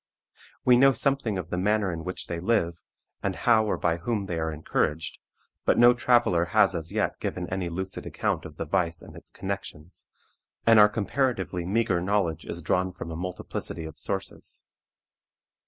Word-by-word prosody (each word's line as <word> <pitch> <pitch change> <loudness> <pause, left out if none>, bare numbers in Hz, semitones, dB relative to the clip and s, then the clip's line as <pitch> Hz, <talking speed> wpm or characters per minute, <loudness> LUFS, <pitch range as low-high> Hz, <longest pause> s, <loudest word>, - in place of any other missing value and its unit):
We 125 -1 +7
know 135 +2 +6
something 135 -7 0
of 90 -3 -6
the 90 - -1
manner 105 0 +1
in 80 -1 -5
which 90 +1 -4
they 85 -1 -4
live, 85 -4 0 0.4
and 95 -2 -1
how 110 +4 +3
or - - 0
by 85 -1 +1
whom 105 +3 -2
they 85 -3 -3
are 80 0 -1
encouraged, 80 0 -2 0.4
but - - +3
no 120 +1 +8
traveler 120 -8 +3
has 100 +2 +4
as 80 -2 -4
yet - - -1
given - - -3
any 90 -2 -2
lucid 95 +2 -5
account - - -1
of - - -10
the - - -3
vice 85 -2 0
and - - -12
its - - -12
connections, 90 -4 -6 0.6
and 115 -1 +7
our 105 0 +8
comparatively 105 -5 -1
meagre 95 -3 +1
knowledge 90 -4 0
is 85 0 -6
drawn 90 +4 +1
from 85 -1 -7
a - - -5
multiplicity 90 -1 -5
of 80 -1 -9
sources. 95 -1 -4
95 Hz, 175 wpm, -27 LUFS, 85-110 Hz, 0.6 s, no